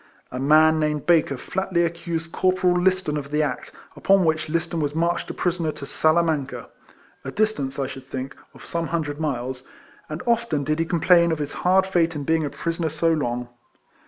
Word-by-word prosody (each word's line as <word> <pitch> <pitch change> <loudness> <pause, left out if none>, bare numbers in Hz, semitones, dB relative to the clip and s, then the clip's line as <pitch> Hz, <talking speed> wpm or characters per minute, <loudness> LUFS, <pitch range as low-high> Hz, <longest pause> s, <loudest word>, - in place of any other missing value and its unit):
A 125 - -4
man 155 +3 +5
named 150 -1 -1
Baker 160 -5 +3
flatly 185 +3 -1
accused 170 -1 -3
Corporal 185 -1 +2
Liston 180 -3 +1
of 140 -1 -5
the 150 +1 +1
act; 140 -4 -4 0.2
upon 195 -2 +3
which 155 -1 0
Liston 165 +1 -1
was 145 -1 -2
marched 170 +1 0
a - - -4
prisoner 170 -3 -1
to 150 -2 -8
Salamanca 155 -2 0 0.5
(a - - -5
distance, 175 -8 -1
I 135 - -1
should 130 0 -8
think, 130 0 -6 0.2
of - - -13
some 170 -1 -2
hundred 150 -3 -3
miles); 130 -4 -3 0.5
and 155 +3 -5
often 235 -11 +1
did 155 +3 -1
he 165 - +1
complain 170 0 +4
of 160 - 0
his 145 -1 -4
hard 190 +1 +3
fate 170 -4 +1
in 145 - -3
being 160 +2 +1
a 145 - -2
prisoner 165 +2 -2
so 165 +2 +1
long. 125 -5 -2
160 Hz, 190 wpm, -23 LUFS, 145-170 Hz, 0.5 s, man